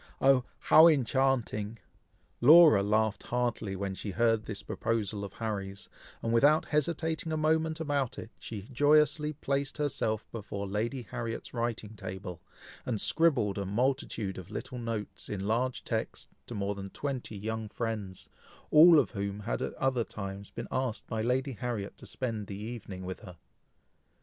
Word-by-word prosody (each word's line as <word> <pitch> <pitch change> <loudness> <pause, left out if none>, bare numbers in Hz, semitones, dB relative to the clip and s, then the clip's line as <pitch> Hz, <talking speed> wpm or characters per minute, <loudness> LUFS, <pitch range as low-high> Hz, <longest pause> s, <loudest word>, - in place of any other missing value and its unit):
oh! 135 -2 +5
how 160 +2 +7
enchanting!" 130 -6 +1 0.6
Laura 155 -4 +8
laughed 110 +1 +1
heartily 120 -5 -1
when 95 0 -3
she 100 - -5
heard 115 +1 +2
this 105 -2 -6
proposal 105 -3 -2
of 100 -1 -7
Harry's, 100 -3 -5 0.3
and 115 - 0
without 145 +7 +5
hesitating 160 +1 -1
a 155 - 0
moment 160 +1 +1
about 145 -5 -1
it, 110 - -8
she 105 -4 -6
joyously 150 - +3
placed 140 -1 -2
herself 115 -7 -1
before 100 -2 -5
Lady 115 +6 -2
Harriet's 115 +2 -5
writing 115 -2 -3
table, 95 -2 -7 0.4
and 115 -4 -2
scribbled 125 - +2
a - - -1
multitude 115 -3 -1
of 90 +1 -10
little 125 +4 -6
notes, 115 -3 -5
in 100 -2 -3
large 120 +4 0
text, - - -3 0.2
to 120 - -6
more 100 0 -1
than 100 -1 -7
twenty 130 -3 -4
young 110 +1 -4
friends, 105 -5 -4 0.4
all 160 +2 +9
of - - +3
whom 100 -2 -3
had 110 - -2
at - - -3
other 130 -3 +1
times 100 -1 -7
been 115 - -6
asked 130 -3 -2
by 110 -1 -3
Lady 130 +4 0
Harriet 115 -4 -4
to - - -10
spend 115 -5 -3
the 100 - -6
evening 105 -4 -7
with 95 0 -5
her. 90 -1 -12
115 Hz, 155 wpm, -30 LUFS, 100-135 Hz, 0.6 s, all